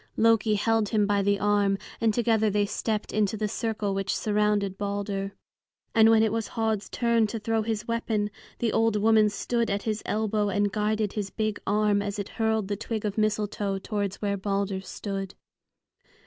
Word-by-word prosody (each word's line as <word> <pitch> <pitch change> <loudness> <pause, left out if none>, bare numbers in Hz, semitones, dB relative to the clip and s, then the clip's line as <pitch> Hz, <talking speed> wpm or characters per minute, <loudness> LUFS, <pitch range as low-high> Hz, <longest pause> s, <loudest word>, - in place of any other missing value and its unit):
Loki 225 -1 +4
held 220 0 +1
him 210 -2 +2
by 200 0 +2
the 200 +1 +2
arm, 205 -1 +2 0.2
and 225 -1 +4
together 220 -1 +2
they 205 0 +1
stepped 215 +1 -3
into 215 0 +1
the 215 0 -1
circle 215 -2 -2
which 195 0 -1
surrounded 210 -2 +1
Balder. 200 0 -3 0.6
And 225 -1 +6
when 225 -1 +5
it 220 - +2
was 225 -1 -1
Höd's 220 -3 -1
turn 235 -2 +2
to 225 - -4
throw 225 +1 0
his 220 0 -3
weapon, 220 -3 -1 0.3
the 230 -2 0
old 225 -1 +2
woman 215 0 +4
stood 235 +3 -1
at 200 0 -1
his 215 -1 -2
elbow 215 -1 0
and 205 +1 +1
guided 210 0 0
his 205 -2 -3
big 215 0 -2
arm 210 -1 +2
as 205 0 -3
it 200 -1 -4
hurled 220 -2 0
the 205 - -1
twig 220 +1 -4
of 205 -1 -2
mistletoe 210 -2 0
towards 200 0 -3
where 200 -1 0
Balder 195 0 -1
stood. 195 -1 -5
210 Hz, 180 wpm, -27 LUFS, 200-220 Hz, 0.6 s, And